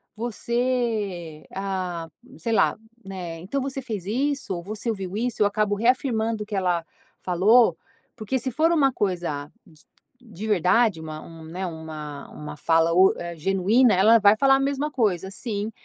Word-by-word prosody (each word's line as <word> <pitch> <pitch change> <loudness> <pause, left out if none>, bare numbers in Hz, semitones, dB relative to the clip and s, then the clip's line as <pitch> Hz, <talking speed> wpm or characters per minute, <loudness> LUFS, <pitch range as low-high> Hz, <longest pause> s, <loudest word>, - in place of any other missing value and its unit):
você 225 -8 -2
ah", 185 -4 -3 0.3
sei 230 - -2
lá - - +3 0.3
né, 180 -4 -6
"Então 215 +11 -3
você 270 0 -3
fez 215 -7 -5
isso, 270 +1 -1
ou 170 - -6
você 215 +5 -4
ouviu 195 -4 -4
isso?" 240 -1 -2
Eu - - +6
acabo 205 0 0
reafirmando 230 -1 +1
o - - -11
que 210 -1 -5
ela 180 -3 0 0.4
falou, 205 +7 +4 0.4
porque 230 +3 -2
se 260 +2 -3
for 315 +7 +2
uma 275 -6 +3
coisa 170 -7 -2
d - - -20 0.5
de 220 -3 -8
verdade, 200 -1 +3
uma 155 -1 -7
um 165 -1 -12
né, 180 +4 -5
uma 155 -3 -8
uma 150 0 -8
fala 165 +1 +3
u 190 +2 +6
eh, 170 0 -6
genuína, 195 +8 +3
ela 220 +5 +6
vai 205 0 +6
falar 270 +2 +5
a - - +1
mesma 280 +2 -1
coisa, 195 -8 0
sim 210 -1 -4
205 Hz, 165 wpm, -24 LUFS, 175-235 Hz, 0.5 s, Eu